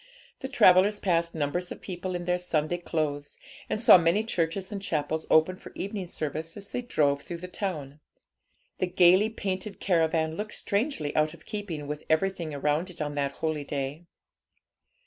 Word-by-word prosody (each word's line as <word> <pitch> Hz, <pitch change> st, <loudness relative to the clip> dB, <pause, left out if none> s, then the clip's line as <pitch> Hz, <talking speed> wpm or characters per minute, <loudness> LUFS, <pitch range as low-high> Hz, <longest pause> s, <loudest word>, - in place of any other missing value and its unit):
The 265 Hz, -, -4 dB
travellers 200 Hz, -5 st, +5 dB
passed 170 Hz, -3 st, +1 dB
numbers 160 Hz, +4 st, -2 dB
of -, -, -6 dB
people 185 Hz, 0 st, -5 dB
in 175 Hz, 0 st, -4 dB
their 180 Hz, 0 st, +1 dB
Sunday 175 Hz, -1 st, -1 dB
clothes, 150 Hz, -4 st, -3 dB, 0.3 s
and -, -, -1 dB
saw 225 Hz, -5 st, +8 dB
many 170 Hz, +6 st, +2 dB
churches 185 Hz, -2 st, -2 dB
and 200 Hz, -1 st, -4 dB
chapels 160 Hz, -3 st, -2 dB
open 160 Hz, +4 st, +4 dB
for -, -, -12 dB
evening 195 Hz, -2 st, -4 dB
service 160 Hz, +1 st, -5 dB
as 200 Hz, 0 st, -9 dB
they 250 Hz, -, -3 dB
drove 145 Hz, -12 st, +1 dB
through 170 Hz, -, -6 dB
the 180 Hz, +2 st, -7 dB
town. 155 Hz, -7 st, -4 dB, 0.8 s
The 185 Hz, -, +1 dB
gaily 180 Hz, +4 st, +5 dB
painted 195 Hz, -2 st, -4 dB
caravan 160 Hz, -3 st, +1 dB
looked 210 Hz, +3 st, -5 dB
strangely 200 Hz, -, -1 dB
out 155 Hz, +1 st, +2 dB
of 155 Hz, -, -20 dB
keeping 185 Hz, -8 st, -5 dB
with 150 Hz, +1 st, -5 dB
everything 170 Hz, 0 st, +1 dB
around 150 Hz, +5 st, 0 dB
it 180 Hz, -, -10 dB
on 145 Hz, -1 st, -2 dB
that 140 Hz, -1 st, -1 dB
holy 155 Hz, -1 st, -2 dB
day. 140 Hz, +3 st, -4 dB
170 Hz, 170 wpm, -28 LUFS, 155-190 Hz, 0.8 s, saw